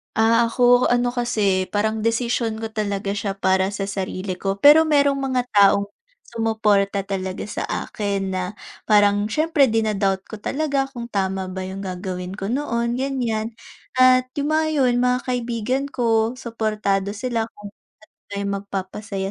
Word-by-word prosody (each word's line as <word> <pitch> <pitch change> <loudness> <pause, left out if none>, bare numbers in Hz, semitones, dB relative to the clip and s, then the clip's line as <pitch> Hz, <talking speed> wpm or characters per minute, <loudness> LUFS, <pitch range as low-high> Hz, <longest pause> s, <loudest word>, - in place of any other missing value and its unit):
Ah, 230 +1 +4
ako, 245 +1 +4
ano 245 0 +2
kasi, 215 -6 0
parang 215 +1 0
desisyon 230 -1 0
ko 225 - -3
talaga 200 -2 -2
siya 200 -1 -2
para 190 0 +1
sa 195 -1 -3
sarili 190 -1 -4
ko. 195 +1 -3
Pero 300 +3 +8
merong 285 -2 +3
mga 265 -2 0
taong 200 -1 +4 0.4
sumuporta 210 -3 +1
talaga 190 -1 -4
sa - - -3
akin 200 -2 -3
na, 185 -1 -2 0.4
parang 205 -1 +4
syempre 305 +5 +2
din 225 -2 +1
doubt 195 -1 +1
ko 220 - -7
talaga 280 +3 -1
kung 240 -3 -8
tama 190 -2 -2
ba 185 0 -5
yung 190 +1 -6
gagawin 185 0 -5
ko 195 - -4
noon, 235 0 -1
ganyan, 235 -4 -2 0.4
at 255 0 +5
yung 290 +2 0
mga 315 0 +2 0.2
yun, 245 - +3
mga 250 0 +2
kaibigan 245 +1 -1
ko 230 -1 +1
suportado 215 -5 -1
sila 225 +1 -2
kung 205 -2 -12 0.6
may 200 - -2
magpapasaya 195 0 -4
220 Hz, 150 wpm, -22 LUFS, 195-245 Hz, 0.6 s, Pero